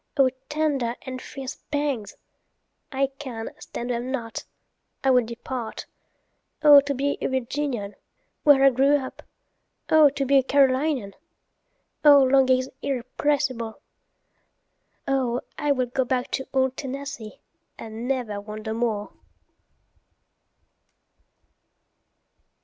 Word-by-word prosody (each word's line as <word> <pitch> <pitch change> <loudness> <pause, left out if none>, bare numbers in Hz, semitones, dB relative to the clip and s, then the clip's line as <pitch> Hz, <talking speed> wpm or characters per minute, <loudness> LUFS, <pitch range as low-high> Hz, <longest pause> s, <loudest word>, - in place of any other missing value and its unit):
O 265 -2 +5 0.2
tender 290 -6 0
and 255 -1 -6
fierce 270 -2 -7
pangs—I 275 0 -4
can 235 -5 -6
stand 250 -4 -5
them 240 +1 -3
not—I 260 +1 -5
will 250 -1 +5
depart;O 255 +5 0
to 280 0 -2
be 280 +2 -1
a - - 0
Virginian, 260 -4 -2 0.5
where 285 -2 +6
I 275 - +7
grew 270 +3 +3
up! 265 -2 -7 0.7
O 310 -2 +7
to 275 0 -2
be 275 +1 +5
a - - 0
Carolinian!O 280 +2 +1
longings 260 -1 +3
irrepressible! 255 -2 -1 1.3
O 255 -3 +1 0.2
I 295 - +1
will 255 -2 +1
go 255 +2 -1
back 250 0 -2
to 265 - -3
old 265 -1 +1
Tennessee, 275 -5 -6 0.4
and 225 +2 -7
never 240 -6 -2
wander 215 +1 -6
more! 225 -3 -2
260 Hz, 100 wpm, -24 LUFS, 240-280 Hz, 1.3 s, I